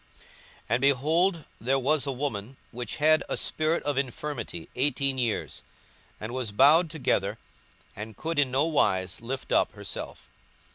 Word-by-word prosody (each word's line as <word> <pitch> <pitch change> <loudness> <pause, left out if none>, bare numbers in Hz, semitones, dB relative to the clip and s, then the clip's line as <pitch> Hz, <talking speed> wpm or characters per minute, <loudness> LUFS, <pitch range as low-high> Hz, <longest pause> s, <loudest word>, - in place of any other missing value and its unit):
42:013:011 - - -23 0.4
And, 120 +3 +2
behold, 155 +6 +2
there 130 +4 +1
was 140 +2 +1
a - - 0
woman 130 -3 -4
which 120 -2 -5
had 155 +1 +4
a - - +1
spirit 155 +2 0
of 145 -2 +1
infirmity 135 - -4
eighteen 135 0 0
years, 120 -3 -2 0.6
and 110 +2 -5
was 125 -5 -2
bowed 150 - +6
together, 110 -9 0 0.6
and 105 0 -7
could 165 -1 -2
in 140 -3 +3
no 135 +4 +2
wise 95 - +1
lift 130 +3 -5
up - - +3
herself. - - -7
135 Hz, 150 wpm, -27 LUFS, 115-150 Hz, 0.6 s, bowed